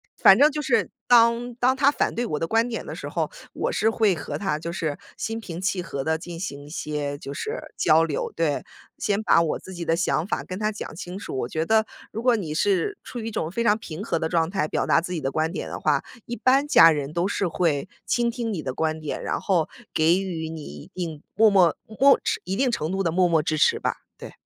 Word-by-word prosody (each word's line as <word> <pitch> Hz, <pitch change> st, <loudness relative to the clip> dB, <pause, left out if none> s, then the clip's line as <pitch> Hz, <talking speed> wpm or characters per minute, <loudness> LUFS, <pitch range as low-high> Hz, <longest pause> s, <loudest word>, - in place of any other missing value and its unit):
反 -, -, +7 dB
正 295 Hz, +2 st, +7 dB
就 300 Hz, +1 st, -3 dB
是 230 Hz, -, +1 dB, 0.2 s
当 235 Hz, 0 st, +4 dB
当 250 Hz, +2 st, +2 dB
他 275 Hz, +1 st, +4 dB
反 -, -, -1 dB
对 240 Hz, -, -1 dB
我 150 Hz, -9 st, -2 dB
的 165 Hz, -, -1 dB
观 225 Hz, +5 st, +2 dB
点 230 Hz, -, -4 dB
的 -, -, -6 dB
时 -, -, -6 dB
候， -, -, -1 dB, 0.2 s
我 -, -, -2 dB
是 220 Hz, -, +2 dB
会 215 Hz, -5 st, +2 dB
和 155 Hz, -, -5 dB
他 175 Hz, -7 st, -1 dB
就 170 Hz, +2 st, -5 dB
是 160 Hz, -4 st, -2 dB, 0.2 s
心 225 Hz, 0 st, -3 dB
平 175 Hz, -6 st, -7 dB
气 185 Hz, -1 st, -1 dB
和 140 Hz, -5 st, -4 dB
地 160 Hz, +3 st, 0 dB
进 170 Hz, 0 st, -8 dB
行 145 Hz, -7 st, -5 dB
一 -, -, -12 dB
些 150 Hz, -2 st, -3 dB
就 140 Hz, 0 st, -7 dB
是 445 Hz, -, -4 dB, 0.2 s
交 160 Hz, +1 st, +4 dB
流 150 Hz, -, -3 dB
对。 160 Hz, -3 st, 0 dB, 0.3 s
先 205 Hz, +1 st, 0 dB
把 170 Hz, -, +4 dB
我 165 Hz, -, -1 dB
自 190 Hz, -, -11 dB
己 175 Hz, -1 st, -5 dB
的 165 Hz, 0 st, +1 dB
想 170 Hz, -2 st, +1 dB
法 -, -, -3 dB
跟 185 Hz, -, -6 dB
他 215 Hz, 0 st, 0 dB
讲 205 Hz, -6 st, -7 dB
清 180 Hz, +2 st, -7 dB
楚。 170 Hz, -, -6 dB
我 120 Hz, -, -3 dB
觉 160 Hz, +1 st, -1 dB
得 220 Hz, +2 st, +3 dB, 0.3 s
如 225 Hz, -, -4 dB
果 245 Hz, -3 st, +4 dB
你 160 Hz, -7 st, -4 dB
是 205 Hz, -, +1 dB
处 245 Hz, -, -7 dB
于 225 Hz, -, -5 dB
一 -, -, -4 dB
种 165 Hz, -4 st, -3 dB
非 235 Hz, +4 st, -1 dB
常 210 Hz, 0 st, +4 dB
平 170 Hz, -3 st, -8 dB
和 170 Hz, -6 st, -1 dB
的 160 Hz, 0 st, -2 dB
状 165 Hz, -1 st, +1 dB
态， 195 Hz, -5 st, 0 dB
表 -, -, 0 dB
达 165 Hz, -, +4 dB
自 180 Hz, -, -6 dB
己 175 Hz, -, -2 dB
的 135 Hz, -2 st, -1 dB
观 155 Hz, +3 st, -1 dB
点 -, -, -4 dB
的 -, -, -5 dB
话， -, -, +1 dB, 0.2 s
一 240 Hz, -, -5 dB
般 265 Hz, +5 st, +3 dB
家 165 Hz, -, +8 dB
人 145 Hz, -2 st, -1 dB
都 175 Hz, +3 st, 0 dB
是 195 Hz, -3 st, -1 dB
会 155 Hz, -5 st, 0 dB, 0.2 s
倾 235 Hz, -1 st, +1 dB
听 230 Hz, -2 st, -3 dB
你 165 Hz, -, -3 dB
的 130 Hz, -, -3 dB
观 160 Hz, +1 st, -1 dB
点， 155 Hz, -, -4 dB
然 -, -, -2 dB
后 175 Hz, -6 st, +1 dB, 0.3 s
给 165 Hz, +4 st, +4 dB
予 165 Hz, -4 st, -4 dB
你 160 Hz, -1 st, -7 dB
一 75 Hz, -, -10 dB
定 165 Hz, -4 st, -4 dB
默 220 Hz, 0 st, +6 dB
默 185 Hz, -5 st, +4 dB, 0.2 s
默 275 Hz, 0 st, +7 dB, 0.3 s
一 190 Hz, +1 st, -2 dB
定 255 Hz, +1 st, +1 dB
程 165 Hz, -4 st, -2 dB
度 195 Hz, -, 0 dB
的 165 Hz, -, +1 dB
默 180 Hz, +1 st, +3 dB
默 160 Hz, -3 st, +2 dB
支 155 Hz, -1 st, -1 dB
持 -, -, +4 dB
吧， -, -, -2 dB, 0.2 s
对。 -, -, -9 dB
180 Hz, 270 characters per minute, -24 LUFS, 160-225 Hz, 0.3 s, 家